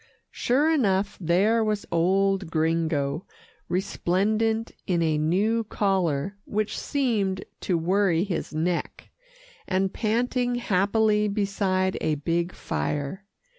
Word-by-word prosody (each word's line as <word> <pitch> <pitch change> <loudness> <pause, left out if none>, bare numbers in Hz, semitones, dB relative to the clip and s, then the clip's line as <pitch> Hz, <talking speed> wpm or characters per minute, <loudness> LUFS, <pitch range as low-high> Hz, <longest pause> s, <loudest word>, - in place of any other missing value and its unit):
Sure 270 +5 +1
enough, 205 -9 +1
there 200 +7 +3
was 210 -1 -1
old 190 +2 +2
Gringo, 160 -2 0 0.4
resplendent 215 +5 0 0.2
in 175 -3 +1
a 155 -2 +1
new 205 +9 +1
collar 195 -4 0
which 215 0 -2
seemed 215 -9 -1
to 180 - 0
worry 180 0 +2
his 190 -5 -3
neck, 165 +3 -2 0.6
and 190 +1 0
panting 245 +2 0
happily 210 -1 +2
beside 195 -2 0
a 155 -1 +1
big 170 +4 -1
fire. 150 +8 -3
195 Hz, 105 wpm, -25 LUFS, 170-215 Hz, 0.6 s, there